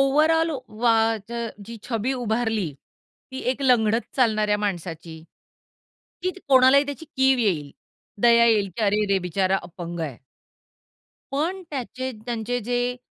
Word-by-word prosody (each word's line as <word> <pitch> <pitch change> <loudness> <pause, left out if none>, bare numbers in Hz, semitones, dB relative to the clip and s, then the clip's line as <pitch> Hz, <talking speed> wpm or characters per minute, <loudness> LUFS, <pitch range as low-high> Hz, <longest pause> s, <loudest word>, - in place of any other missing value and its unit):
Overall 310 +4 +3 0.2
वा 230 +1 +2 0.3
च - - -9 0.3
जी 230 +1 -8
छबी 235 +2 -1
उभारली 225 - -1 0.6
ती 260 - -5
एक 265 +2 -4
लंगडत 230 -3 +3 0.2
चालणाऱ्या 215 -5 +2
माणसाची, 170 -5 -5 1.0
की 370 - +1 0.2
कोणालाही 265 +1 +6
त्याची 285 +3 -6
कीव 265 -1 +4
येईल. 165 -11 0 0.5
दया 235 -1 +6
येईल, 210 -4 +3
की - - -2
अरेरे! 205 -1 +2
बिचारा 190 +2 0
अपंग 175 -1 -7
आहे. 145 -7 -4 1.1
पण 335 +7 -1
त्याचे 260 -1 -4 0.2
त्यांचे 240 +1 -2
जे 245 +2 -1
230 Hz, 125 wpm, -24 LUFS, 200-260 Hz, 1.1 s, कोणालाही